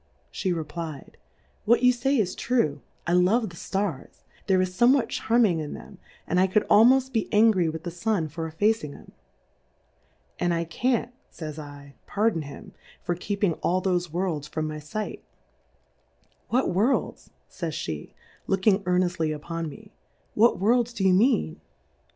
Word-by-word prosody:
She 190 - -2
reply'd, 160 -2 -5 0.5
what 235 +3 +4
you 250 0 +6
fay 270 +3 +1
is 200 -6 +1
true, 155 - 0 0.2
I 170 - 0
love 185 +4 +3
the - - -12
Stars^ 190 -5 -4 0.2
there 190 -2 +3
is 185 0 0
fomewhat 245 +2 +4
charming 220 -7 +2
ia 155 - -4
them, - - -10 0.3
and 180 - +1
I 190 - +4
could 200 +3 +1
almoft 255 +5 +5
be 225 -3 -1
angry 210 -5 +4
witli 160 0 -4
the 175 - -4
Stm 175 -3 -1
for 165 +1 -4
effacing 160 -2 0
'em. - - -15 1.3
And 175 -1 +1
I 165 - 0
can't, 240 +8 -1 0.2
fays 155 -2 -7
7, 145 -2 -10
pardon 210 -5 +1
him, 155 +8 -10 0.3
for 175 - -1
keeping 200 +1 -1
all 180 +2 +1
thofe 180 -2 0
"Worlds 165 -3 -2
from 155 0 -3
my 155 0 -5
fight: 210 +9 -5 1.3
What 255 +3 +1
Worlds,. 220 +9 0 0.2
fays 165 -4 -5
pe^ 80 - -5 0.4
looking 195 +1 +2
earneftly 180 -3 +1
upon 165 +2 -5
uie,. 210 +5 -13 0.4
whu 230 +3 +4
V/orJJs 235 +3 +2
do 195 - -2
you 190 -1 +5
mean 230 +9 +2
185 Hz, 155 wpm, -26 LUFS, 160-220 Hz, 1.3 s, you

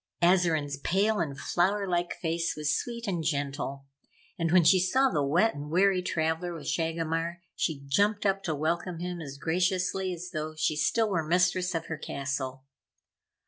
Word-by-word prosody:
Azarine's 165 -5 +3
pale 200 +8 +1
and 140 -5 -2
flower 195 +8 +1
like 175 -1 -1
face 165 0 -1
was 150 0 +1
sweet 235 -1 -4
and 175 -6 -2
gentle 140 -2 -2 0.5
and, 165 -2 -1
when 180 -1 +6
she 180 +4 +6
saw 260 +9 +3
the 150 - +1
wet 175 +11 +3
and 145 +1 -7
weary 185 +3 +3
traveller 165 0 -1
with 165 - -9
Shagomar, 165 +1 -1
she 145 -4 -2
jumped 205 +9 +1
up 195 0 +2
to 160 - -1
welcome 170 +4 -1
him 175 0 -4
as 140 -3 -7
graciously 185 +4 0
as 180 0 -6
though 155 0 -4
she 155 0 0
still 210 +9 +1
were 170 -4 +1
mistress 180 +1 +2
of 165 0 -2
her 160 -1 -5
castle. 135 -1 -4
170 Hz, 170 wpm, -28 LUFS, 155-185 Hz, 0.5 s, when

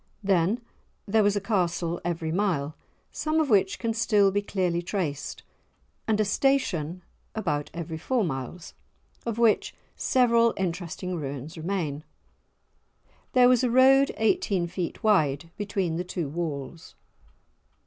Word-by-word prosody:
Then 195 +4 +2 0.5
there 220 +2 +3
was 205 0 +3
a - - +1
castle 175 -4 -1
every 165 -2 -2
mile, 165 -6 0 0.4
some 310 +1 0
of 300 -5 +1
which 195 -2 +3
can 230 -1 -1
still 210 -3 +3
be 205 +1 +1
clearly 180 -4 -1
traced, 160 -6 -3 0.6
and 215 -1 +2
a 215 - +3
"station," 185 - 0 0.3
about 150 -8 -1
every 165 -1 -5
four 245 +6 0
miles, 155 +2 -5 0.5
of 230 -1 -2
which 230 -2 +2 0.2
several 235 -2 +3
interesting 180 0 -3
ruins 145 +1 -6
remain. 160 -4 -3 1.3
There 250 -2 +6
was 250 0 +4
a 250 - +2
road 265 +3 +5
eighteen 220 - +1
feet 175 0 -5
wide 165 -7 +2
between 195 -5 -2
the 175 - -1
two 175 -3 -4
walls. 155 0 -5
185 Hz, 130 wpm, -26 LUFS, 165-220 Hz, 1.3 s, There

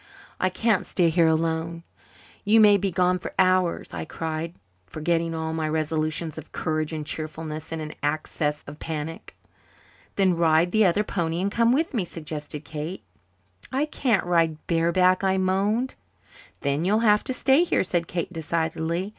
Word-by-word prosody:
"I 185 - +2
can't 210 +2 +1
stay 175 -3 +2
here 165 0 +4
alone. 165 +1 0 0.6
You 215 +2 +5
may 210 -2 +7
be 195 0 0
gone 180 +1 +2
for - - -7
hours," 185 -2 +2
I 80 -2 -4
cried, 160 - -4 0.3
forgetting 165 - -1
all 160 0 -3
my 160 -1 -1
resolutions 155 0 -1
of 160 - -13
courage 155 0 -2
and 155 -2 -4
cheerfulness 155 +1 -5
in 165 - -3
an 155 0 -6
access 150 0 -1
of 145 +1 -10
panic. 160 +1 -6 0.8
"Then 190 -3 +3
ride 165 +1 +3
the 215 +1 +4
other 195 +3 +3
pony 170 -4 -2
and 195 +2 0
come 230 +2 +3
with 310 +5 +1
me," 225 -7 +1
suggested 155 -3 -6
Kate. 155 +2 -6 0.7
"I 275 +3 +1
can't 245 -10 0
ride 165 -3 +2
bareback," 180 +3 +3
I 190 0 +2
moaned. 200 +7 +1 0.7
"Then 140 +2 0
you'll 210 +5 +2
have 210 -1 +4
to - - -2
stay 270 +5 +4
here," 355 - +1
said 175 -2 -1
Kate 175 +1 -3
decidedly. 165 +2 -2
170 Hz, 165 wpm, -25 LUFS, 160-190 Hz, 0.8 s, may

